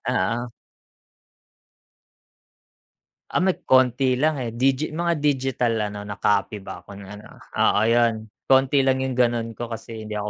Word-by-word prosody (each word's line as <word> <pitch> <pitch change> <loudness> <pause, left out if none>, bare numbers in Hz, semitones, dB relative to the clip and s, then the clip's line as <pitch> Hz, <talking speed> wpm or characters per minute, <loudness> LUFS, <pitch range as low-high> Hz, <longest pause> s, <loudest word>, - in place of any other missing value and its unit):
Oo. 115 +6 0 2.9
Ah, - - 0
may 190 -1 +1
konti 130 0 +3
lang, 155 -1 +2
eh. 120 -3 -4
Digi 135 +5 0
mga 170 0 0
digital 135 -5 0 0.2
ano, 105 0 -8
na 100 - -5
copy 105 0 0
ba 90 -2 -10
ako 100 - -11
ng 100 -1 -11
ano? 105 +1 -10 0.3
Oo, 105 - +3
'yun. 115 -2 +1 0.2
Konti 135 +1 +3
lang 130 0 +2
yung 130 -1 -3
ganu'n 115 -2 0
ko 120 - -4
kasi 115 -1 -8
hindi 105 - -6
ako 105 0 -3
120 Hz, 150 wpm, -23 LUFS, 110-135 Hz, 2.9 s, konti